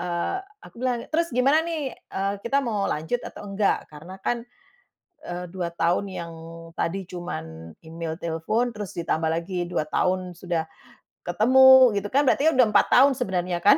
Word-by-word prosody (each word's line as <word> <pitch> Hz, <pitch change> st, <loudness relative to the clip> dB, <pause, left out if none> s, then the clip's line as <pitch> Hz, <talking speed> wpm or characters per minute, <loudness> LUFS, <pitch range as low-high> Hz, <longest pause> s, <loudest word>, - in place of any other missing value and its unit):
eee, 175 Hz, -, -2 dB, 0.3 s
aku -, -, -16 dB
bilang, 245 Hz, -2 st, -1 dB
"Terus, 335 Hz, +1 st, +2 dB
gimana 275 Hz, +6 st, +3 dB
nih, 315 Hz, -6 st, -3 dB
eee, 195 Hz, +1 st, -4 dB
kita 275 Hz, +4 st, +1 dB
mau 210 Hz, -5 st, -1 dB
lanjut 160 Hz, +11 st, -2 dB
atau -, -, -9 dB
enggak? 200 Hz, 0 st, 0 dB
Karena 170 Hz, +6 st, -11 dB
kan, 235 Hz, +3 st, -2 dB, 0.8 s
eee, 175 Hz, 0 st, -5 dB
2 175 Hz, -2 st, -3 dB
tahun 170 Hz, +4 st, +1 dB
yang 170 Hz, -3 st, -6 dB, 0.5 s
tadi 190 Hz, +2 st, -2 dB
cuman 80 Hz, -, -7 dB
email, 165 Hz, 0 st, -5 dB
telfon, 170 Hz, +9 st, -1 dB
terus 205 Hz, -3 st, -7 dB
ditambah 165 Hz, -1 st, -1 dB
lagi 175 Hz, +2 st, -2 dB
2 175 Hz, -, -1 dB
tahun 185 Hz, 0 st, 0 dB
sudah 175 Hz, -3 st, -1 dB, 0.6 s
ketemu, 255 Hz, +5 st, +7 dB
gitu 205 Hz, -, -6 dB
kan, 280 Hz, +5 st, +2 dB
berarti 290 Hz, +4 st, +4 dB
ya -, -, 0 dB
udah 250 Hz, -3 st, +6 dB
4 -, -, +5 dB
tahun, 275 Hz, +2 st, +6 dB
sebenarnya 180 Hz, -7 st, -1 dB
kan? 240 Hz, +10 st, +6 dB
190 Hz, 165 wpm, -25 LUFS, 170-245 Hz, 0.8 s, ketemu